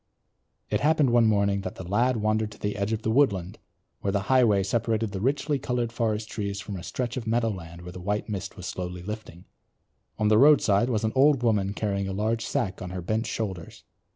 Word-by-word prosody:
It - - +2
happened 150 -3 +3
one 120 -1 +5
morning 100 -2 +2
that 95 - -6
the 90 - -8
lad 120 +6 +2
wandered 110 0 0
to - - -17
the 105 0 -2
edge 100 +1 -2
of 110 0 -2
the 110 - 0
woodland 100 -8 +1 0.4
where 100 - -1
the 100 0 0
highway 110 -7 +4
separated 110 +1 0
the 95 -2 -4
richly 140 +3 0
coloured 120 -2 -1
forest 110 -2 -1
trees 100 -2 -4
from 100 +1 -6
a 90 - -6
stretch 120 +6 -4
of 115 -3 -5
meadowland 95 -8 -2
where 90 - -8
the 90 - -9
white 105 +3 -2
mist 100 -1 -5
was 90 - -8
slowly 90 -1 -5
lifting. 105 -4 -7 0.7
On 105 - +1
the 110 0 +5
roadside 125 -6 +5
was 115 -3 0
an 110 - +1
old 135 -1 +4
woman 105 -3 +1
carrying 100 -2 -1
a 95 - -3
large 110 +3 -1
sack 95 -4 -2
on 90 - -5
her 90 0 -5
bent 110 +5 -1
shoulders. 95 -7 -5
105 Hz, 210 wpm, -26 LUFS, 100-115 Hz, 0.7 s, one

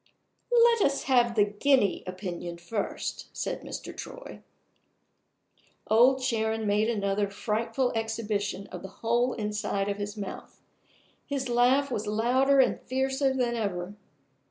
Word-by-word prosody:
"Let 470 -1 +5
us 275 -4 +2
have 245 -3 +3
the 205 -2 +5
guinea 205 +1 +2
opinion 180 -2 -5
first," 205 +4 -4
said - - -3
Mr. - - -7
Troy. - - -9 1.4
Old 255 +4 +4
Sharon 220 -3 0
made 210 +2 +2
another 200 -2 0
frightful 230 +5 -1
exhibition 220 -3 -2
of - - -7
the - - -7 0.2
whole 240 +2 +2
inside 210 -2 -2
of 200 - -2
his 205 +1 -5
mouth; 200 -2 -7 0.7
his 275 -3 -2
laugh 255 +3 +3
was 215 -3 -2
louder 255 +6 +3
and 260 - +3
fiercer 265 +1 0
than 250 -2 0
ever. 195 -3 -3
225 Hz, 130 wpm, -28 LUFS, 205-260 Hz, 1.4 s, Let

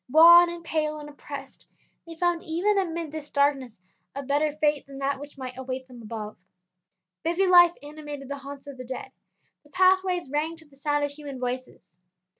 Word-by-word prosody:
Wan 340 +4 +9
and 340 0 -7
pale 305 -2 -1
and 295 -1 -8
oppressed, 285 -1 -10 0.4
they 330 - -8
found 345 0 +1
even 380 +6 +1
amid 335 -4 -3
this 305 -1 -7
darkness 275 -6 +1 0.4
a 280 - -4
better 290 +3 +1
fate 295 -2 +2
than 275 -1 -10
that 275 0 -1
which 290 0 -10
might 255 -2 -6
await 260 0 -5
them 245 -2 -12
above. 215 -1 -6 0.9
Busy 345 +4 +1
life 350 -2 +7
animated 295 -2 -8
the 280 +1 -4
haunts 275 0 -9
of 280 -2 -9
the 255 - -7
dead; 255 +1 -7 0.5
the 295 - -22
pathways 370 -2 +2
rang 310 +3 -1
to 320 -1 -16
the 285 - -22
sound 290 +1 0
of 290 - -1
human 285 -3 -8
voices. 250 -8 -6
290 Hz, 185 wpm, -26 LUFS, 270-330 Hz, 0.9 s, Wan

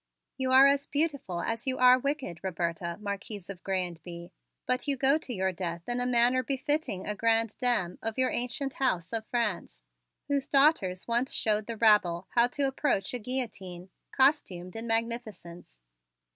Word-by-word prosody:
"You 260 -1 -2
are 265 +1 +8
as 280 0 +3
beautiful 280 - -2
as 230 +3 -3
you 260 - 0
are 255 0 +6
wicked, 275 - -3
Roberta, 170 -2 -3
Marquise 200 -1 -6
of 185 -2 -11
Grez 190 -2 -1
and 170 -3 -10
Bye, 170 0 -9 0.3
but 255 +2 -1
you 280 -1 +1
go 275 +4 +3
to 290 - -5
your 190 -4 0
death 170 -2 -5
in 245 0 -1
a 245 - -1
manner 245 +1 +4
befitting 275 - -2
a 210 - -2
grande 225 0 +1
dame 235 -9 0
of 225 +1 -3
your 260 0 +1
ancient 255 +3 -2
house 185 -9 -1
of 220 -1 -3
France, 210 - -2 0.5
whose 280 -2 0
daughters 270 - +3
once 240 +2 0
showed 215 -1 0
the 230 -1 -5
rabble 200 -6 +3
how 235 0 +4
to 280 +3 -3
approach 270 -6 0
a 250 - -3
guillotine, 195 -7 -6 0.2
costumed 190 - +1
in 225 +1 -5
magnificence. 225 - -4
230 Hz, 170 wpm, -29 LUFS, 185-260 Hz, 0.5 s, are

